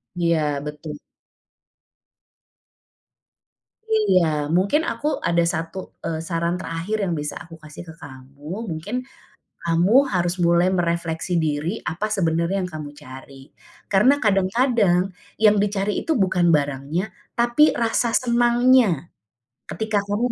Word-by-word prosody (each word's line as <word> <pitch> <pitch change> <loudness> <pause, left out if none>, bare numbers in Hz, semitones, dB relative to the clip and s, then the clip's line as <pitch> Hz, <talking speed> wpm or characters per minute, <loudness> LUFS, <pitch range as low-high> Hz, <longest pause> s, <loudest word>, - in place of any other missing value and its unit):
Iya, 160 -4 0
betul. 150 0 -7 3.0
Iya, 425 - +3 0.3
mungkin 200 - +2
aku 295 - -4 0.2
ada 170 0 +2
1, 165 +2 -4 0.3
eee, 160 -1 -2
saran 170 0 -1
terakhir 180 +5 -3
yang 180 -3 -1
bisa 150 - -4
aku 165 0 -12
kasih 150 +3 -10
ke - - -9
kamu. 135 0 -13 0.3
Mungkin, 165 +9 -5 0.7
kamu 170 +6 +2 0.2
harus 175 -1 0
mulai 170 +1 +4
merefleksi 170 -1 -1
diri 160 +5 -1
apa 200 +6 -3
sebenarnya 170 0 0
yang 180 - -2
kamu 150 -2 -6
cari. 135 0 -12 0.4
Karena 240 +9 +4
kadang-kadang 195 -2 +2 0.2
yang 215 -1 +5
dicari 205 0 0
itu 320 -8 0
bukan 180 -2 +2
barangnya, 145 +5 0 0.3
tapi 240 +6 +4
rasa 230 0 0
senangnya 240 - +3 0.6
ketika 220 -2 -1
kamu 230 +4 0
175 Hz, 115 wpm, -22 LUFS, 160-215 Hz, 3.0 s, yang